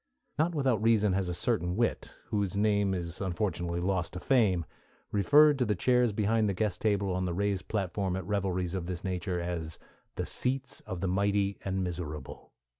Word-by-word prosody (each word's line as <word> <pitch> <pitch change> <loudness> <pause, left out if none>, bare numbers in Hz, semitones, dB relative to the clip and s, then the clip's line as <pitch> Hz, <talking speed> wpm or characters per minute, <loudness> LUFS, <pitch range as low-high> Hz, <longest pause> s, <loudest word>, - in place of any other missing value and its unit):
Not 165 +2 +2
without 130 -7 +1
reason 110 -3 +3
has 95 -1 0
a - - -1
certain 90 -3 0
wit, 115 +2 -1
whose 100 -3 -1
name 100 -2 +2
is 85 0 -5
unfortunately 90 -2 -1
lost 90 -2 -1
to 90 - -5
fame, 95 - +2 0.5
referred 145 +8 +5
to 125 - +2
the 105 -2 +1
chairs 125 +4 +3
behind 110 +1 +1
the 100 - -1
guest 100 -3 -1
table 100 -3 +1
on 95 0 -1
the 85 -2 -2
raised 100 -1 -1
platform 95 -2 -1
at 95 -2 -4
revelries 95 -3 -1
of 90 -3 -3
this 90 -1 -5
nature 90 -1 -2
as 85 -2 -3 0.4
"The - - -2
Seats 130 +1 0
of 95 -4 -5
the 95 - 0
Mighty 100 +1 +1
and 95 -1 -1
Miserable." 80 -6 -6
95 Hz, 185 wpm, -30 LUFS, 90-105 Hz, 0.5 s, referred